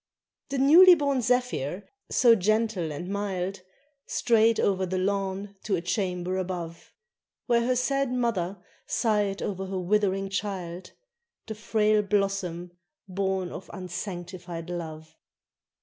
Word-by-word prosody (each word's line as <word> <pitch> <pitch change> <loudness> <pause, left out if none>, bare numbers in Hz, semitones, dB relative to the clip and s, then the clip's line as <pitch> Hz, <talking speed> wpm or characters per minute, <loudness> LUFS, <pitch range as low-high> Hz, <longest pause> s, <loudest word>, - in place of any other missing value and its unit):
The 275 - -2
newly 340 +7 +8
born 280 -4 0
zephyr, 235 - -1 0.2
so 240 -2 +5
gentle 215 -4 +1
and 150 +5 -6
mild, 195 -1 -3 0.5
Strayed 230 -1 +3
over 190 -1 +1
the 185 +1 -2
lawn 195 +1 -2
to 205 - +1
a 170 - -2
chamber 180 -1 -1
above, 175 -3 -5 0.5
Where 235 -1 +3
her 255 - +2
sad 275 +1 0
mother 220 -7 -1 0.3
sighed 210 -4 0
o'er 190 -1 -3
her 190 0 -3
withering 195 +1 +1
child, 185 -3 -4 0.5
The 220 - -5
frail 215 0 +2
blossom 195 -4 -1 0.4
born 190 -1 -2
of 190 - -9
unsanctified 175 -2 -6
love. 160 -2 -7
195 Hz, 120 wpm, -27 LUFS, 180-220 Hz, 0.5 s, newly